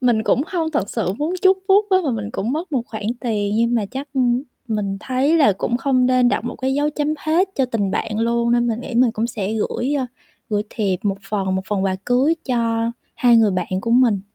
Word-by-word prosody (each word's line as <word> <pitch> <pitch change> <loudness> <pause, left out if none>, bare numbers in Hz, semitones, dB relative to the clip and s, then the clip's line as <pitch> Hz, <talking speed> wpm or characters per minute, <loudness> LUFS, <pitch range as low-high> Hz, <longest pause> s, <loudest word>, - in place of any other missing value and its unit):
mình 240 -4 +2
cũng 250 +4 +2
hông 335 -4 -2
thật 210 -9 -1
sự 205 -5 -1
muốn 320 +5 -1
chúc 380 0 +5
phúc 405 +2 +5
á, 375 - +5
mà 280 - +1
mình 215 -3 -3
cũng 220 +6 -2
mất 320 +3 -4
một 255 -4 +1
khoản 215 -1 -7 0.2
tiền. 210 -4 -1
Nhưng 235 +1 +2
mà 220 -4 0
chắc, 270 +2 -6
ừm, 250 0 +2 0.3
mình 205 -3 -2
thấy 265 +7 +1
là 280 -10 +5
cũng 230 +5 -1
không 255 -1 +2
nên 255 -1 +4
đặt 235 - -1
một 245 - -4
cái 265 0 -1
dấu 290 +1 +1
chấm 300 +1 -1
hết 335 +6 +1
cho 270 - +2
tình 210 -6 -1
bạn 215 +2 -2
luôn. 235 +1 +1
Nên 240 0 +2
mình 230 -1 -1
nghĩ 250 - -7
mình 245 0 +4
cũng 230 0 -1
sẽ 215 -3 -3
gửi, 245 +5 -1
ờ, 255 - -1 0.4
gửi 210 -1 0
thiệp 200 -5 -1
một 200 -2 0
phần, 195 -3 -1
một 190 - -1
phần 200 -2 0
quà 190 -1 0
cưới 265 +6 +3
cho 230 -2 0 0.2
hai 245 -5 +4
người 220 -2 +4
bạn 185 -2 -2
của 230 +3 -3
mình. 235 -5 +4
240 Hz, 245 wpm, -20 LUFS, 215-270 Hz, 0.4 s, chúc